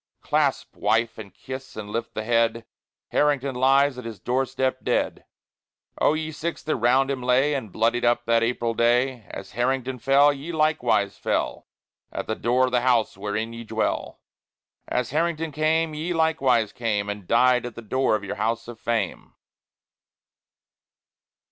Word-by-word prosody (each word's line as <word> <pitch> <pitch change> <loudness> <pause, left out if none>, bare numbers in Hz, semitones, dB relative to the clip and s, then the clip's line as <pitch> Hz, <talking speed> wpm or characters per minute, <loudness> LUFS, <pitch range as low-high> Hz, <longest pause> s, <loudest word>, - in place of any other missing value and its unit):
Clasp, - - 0
Wife, 115 +1 0
and 100 -3 -9
kiss, 130 0 -9
and 105 -1 -7
lift 115 +2 -4
the 110 - -2
head: 115 0 +1 0.4
Harrington 140 -2 +1
lies 135 +1 +3
at - - -8
his 115 -3 -7
doorstep 130 +1 -1
dead. - - -1 0.7
But, - - -6
O - - +5
ye 155 0 -3
Six 165 +2 -4
that 155 - 0
round 130 +3 +3
him 135 -2 -3
lay 130 +4 +3
And 130 -8 -4
bloodied 115 +4 +1
up 120 0 +2
that 115 0 +3
April 115 0 0
day! 120 0 +1
As 95 - -8
Harrington 130 +1 -1
fell, 140 +4 +5
ye 140 +5 -7
likewise 155 -10 +1
fell - - -2 0.4
At - - -4
the 110 - -2
door 125 +3 +2
of 130 - -3
the 125 -1 +2
House 120 -3 +2
wherein 105 +3 -3
ye 115 0 -7
dwell; 110 - -2 0.7
As 125 -1 -1
Harrington 165 +1 0
came, 155 +1 +1
ye 160 +4 -3
likewise 135 -9 +2
came 110 -5 -1
And 105 -3 -6
died 125 +1 +4
at 120 - -10
the 115 - -7
door 130 +1 +1
of 105 - -3
your 100 - -5
House 115 +2 -1
of 120 -2 -9
Fame. 115 -5 -2
125 Hz, 165 wpm, -24 LUFS, 115-135 Hz, 0.7 s, O